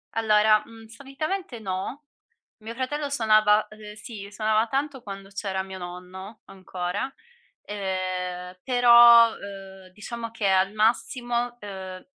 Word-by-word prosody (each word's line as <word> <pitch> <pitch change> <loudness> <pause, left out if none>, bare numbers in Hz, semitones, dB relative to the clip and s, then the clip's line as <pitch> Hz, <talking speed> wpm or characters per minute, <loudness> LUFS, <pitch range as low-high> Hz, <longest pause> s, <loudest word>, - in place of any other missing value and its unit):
Allora, 215 -1 +4
uhm, 225 -1 -14
solitamente 275 - -5
no. 195 +8 -5 0.6
Mio 230 +2 -7
fratello 280 +3 -3
suonava 215 -4 +4
ehm, 215 -1 -11
sì, 210 -2 -9
suonava 215 +1 +1
tanto 275 0 -2
quando 195 -2 -9
c'era 195 -1 -3
mio 190 0 -9
nonno 185 +3 -9
ancora. 190 +6 -5 0.5
Ehm, 185 -2 -4
però, 235 -2 +7
uhm, 195 -1 -10
diciamo 230 +3 -7
che 220 -3 -1
al 190 +1 +3
massimo, 240 +2 0
uhm, 190 -2 -8
215 Hz, 120 wpm, -25 LUFS, 190-235 Hz, 0.6 s, però